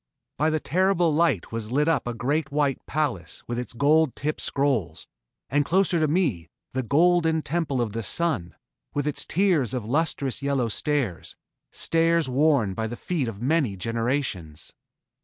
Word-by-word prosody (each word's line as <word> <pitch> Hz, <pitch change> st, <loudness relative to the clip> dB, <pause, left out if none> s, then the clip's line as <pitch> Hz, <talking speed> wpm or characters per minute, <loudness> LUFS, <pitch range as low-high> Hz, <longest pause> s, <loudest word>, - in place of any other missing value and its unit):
By 155 Hz, +2 st, +3 dB
the 155 Hz, 0 st, 0 dB
terrible 180 Hz, 0 st, +2 dB
light 155 Hz, -, +1 dB
was 115 Hz, -1 st, -4 dB
lit 150 Hz, +4 st, +2 dB
up 160 Hz, -6 st, +1 dB
a 120 Hz, -, -3 dB
great 145 Hz, +6 st, -1 dB
white 145 Hz, -2 st, 0 dB
palace 150 Hz, -3 st, -2 dB
with 120 Hz, 0 st, -2 dB
its 125 Hz, -, -5 dB
gold 145 Hz, +3 st, +3 dB
tipped 150 Hz, +2 st, -3 dB
scrolls, 135 Hz, -, -1 dB, 0.4 s
and 145 Hz, +3 st, +2 dB
closer 180 Hz, +2 st, +2 dB
to 155 Hz, -, +2 dB
me, 145 Hz, -, 0 dB, 0.2 s
the 130 Hz, -, 0 dB
golden 160 Hz, +4 st, +3 dB
temple 155 Hz, -5 st, -1 dB
of 115 Hz, -3 st, 0 dB
the 115 Hz, -, -2 dB
Sun, 120 Hz, -, -2 dB, 0.4 s
with 145 Hz, 0 st, 0 dB
its 150 Hz, -, -1 dB
tiers 165 Hz, -, +2 dB
of 120 Hz, -4 st, -3 dB
lustrous 140 Hz, 0 st, -1 dB
yellow 140 Hz, -4 st, 0 dB
stairs 130 Hz, -, -2 dB, 0.3 s
stairs 165 Hz, -1 st, +1 dB
worn 130 Hz, -6 st, +2 dB
by 110 Hz, +3 st, -2 dB
the 120 Hz, +2 st, -6 dB
feet 160 Hz, -4 st, -2 dB
of 115 Hz, 0 st, -6 dB
many 135 Hz, -8 st, +1 dB
generations. 115 Hz, -, -3 dB
140 Hz, 160 wpm, -25 LUFS, 120-160 Hz, 0.4 s, By